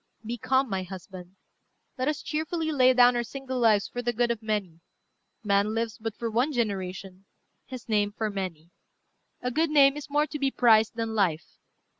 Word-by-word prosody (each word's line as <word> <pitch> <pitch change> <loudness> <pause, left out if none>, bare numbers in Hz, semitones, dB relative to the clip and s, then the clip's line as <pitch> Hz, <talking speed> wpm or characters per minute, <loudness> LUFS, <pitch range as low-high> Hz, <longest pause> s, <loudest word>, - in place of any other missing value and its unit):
Be 235 +2 -3
calm, 265 +4 +1
my 190 -4 -2
husband. 185 0 -10 0.6
Let 255 +1 -2
us 300 0 -2
cheerfully 315 +1 -2
lay 255 -3 +5
down 245 0 +6
our 240 - +1
single 260 +1 -5
lives 215 -4 +3
for 245 - -5
the 240 0 0
good 240 +1 +1
of 230 -2 -3
many. 205 -7 -3 0.6
Man 205 +1 +1
lives 230 0 -3
but 225 -1 -5
for 230 0 -4
one 245 +7 +1
generation; 195 -5 -4 0.4
his 255 -2 -9
name, 205 -2 +1
for 215 0 -3
many. 180 -4 -6 0.7
A 250 - -1
good 320 +5 +1
name 280 -2 +5
is 295 -1 -8
more 295 +1 +2
to 300 0 -7
be 275 -1 +1
prized 225 -4 +4
than 225 -1 -3
life." 180 -7 +1
230 Hz, 185 wpm, -27 LUFS, 200-260 Hz, 0.7 s, down